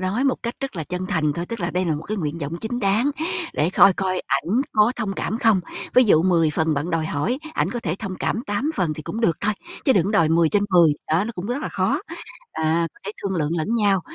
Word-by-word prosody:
nói 190 +8 0
một 270 - +3
cách 235 +1 -3
rất 270 -7 -4
là 160 - -3
chân 180 +3 -4
thành 155 -4 +1
thôi, 170 +4 -4
tức 230 +1 -6
là 175 0 -1
đây 180 +1 0
là 165 -3 0
một 150 - -5
cái 215 +6 -4
nguyện 160 -3 -3
vọng 155 +1 -4
chính 235 +2 -3
đáng, 215 +7 +2 0.4
để 155 +4 +1
coi 195 +1 +6
coi 185 -1 -1
ảnh 170 - +1
có 215 +2 +4
thông 215 -4 -2
cảm 215 +3 -3
không. 225 -5 +4 0.3
Ví 255 - +7
dụ 165 -8 +5
10 170 -4 +3
phần 160 +1 0
bạn 145 +5 -2
đòi 165 -2 0
hỏi, 165 - -1 0.2
ảnh - - 0
có 245 - -3
thể 170 -7 -2
thông 195 -4 -5
cảm 225 - -1
8 205 +9 -1
phần 170 - 0
thì 155 - -8
cũng 220 - -5
được 170 -9 +2
thôi, 210 - +2 0.3
chứ 270 - +5
đừng 190 -8 +3
có 200 - -1
đòi 170 -7 +3
10/10, 170 0 +4 0.2
đó, 165 +5 +3
nó 230 - -4
cũng 180 0 -5
rất 250 +6 -2
là - - -2
khó. - - 0 0.5
À, 160 +1 +1
có - - -23
thể 205 - -3
thương 195 -1 -2
lượng 160 +1 0
lẫn 170 +8 -1
nhau, 205 -4 +3
185 Hz, 265 wpm, -22 LUFS, 160-215 Hz, 0.5 s, Ví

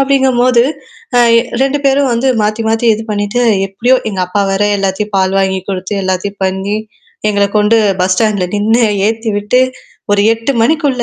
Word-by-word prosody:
அப்டிங்கும்போது, 260 -3 +2 0.5
அ - - +5 0.2
எ 230 - +2 0.2
2 275 +2 0
பேரும் 275 -1 +2
வந்து 235 +3 0
மாத்தி 215 +2 -1
மாத்தி 225 +1 0
இது 220 - -6
பண்ணிட்டு, 205 +4 -1 0.2
எப்டியோ 240 +7 +1
எங்க 190 - -4
அப்பா 180 +3 -1
வேற 195 +1 0 0.2
எல்லாத்தையும் 200 +2 -3
பால் 190 0 +1
வாங்கி 190 -1 0
குடுத்து, 190 +1 -4
எல்லாத்தையும் 190 +2 -3
பண்ணி, 190 +2 -2 0.5
எங்கள 200 -1 +1
கொண்டு 210 +2 +3 0.2
பஸ் 185 +1 +2
ஸ்டாண்ட்ல 205 -3 0
நின்னு, 225 +4 +2 0.3
ஏத்தி 225 0 -3
விட்டு 210 +5 +1 0.5
ஒரு 200 0 +3
8 230 +4 -3
மணிக்குள்ள 285 -2 +1
215 Hz, 165 wpm, -13 LUFS, 195-245 Hz, 0.5 s, அ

